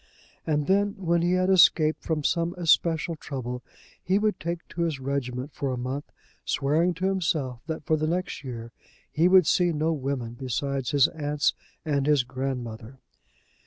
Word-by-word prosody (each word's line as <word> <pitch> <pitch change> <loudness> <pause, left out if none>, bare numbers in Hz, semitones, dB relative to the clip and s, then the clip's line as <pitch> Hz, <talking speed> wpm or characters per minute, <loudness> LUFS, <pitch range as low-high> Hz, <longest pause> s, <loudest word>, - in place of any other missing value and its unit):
And 150 -2 +1
then, 200 +3 +2
when 170 -3 +1
he 175 +1 +2
had 185 +1 +2
escaped 160 -4 +5
from 155 -2 -1
some 170 +3 0
especial 165 0 +2
trouble, 125 -5 -5 0.4
he 190 +2 +2
would 210 0 0
take 170 +1 -4
to 170 - -5
his 160 -5 -1
regiment 130 0 -3
for 140 -2 -2
a 125 - -2
month, 130 +4 -4 0.3
swearing 160 +5 +1
to 180 +3 -3
himself 160 -10 -1
that 160 -3 -4
for 155 - +2
the 155 +1 -1
next 180 -2 -2
year 115 -3 -7 0.4
he 165 +3 +3
would 185 -2 +6
see 175 +2 +3
no 160 +1 0
women 135 -5 -3
besides 135 0 -2
his 140 -2 +5
aunts 150 -1 0 0.3
and 140 -2 0
his 145 -4 +4
grandmother. 125 -2 -5
150 Hz, 165 wpm, -26 LUFS, 135-170 Hz, 0.4 s, would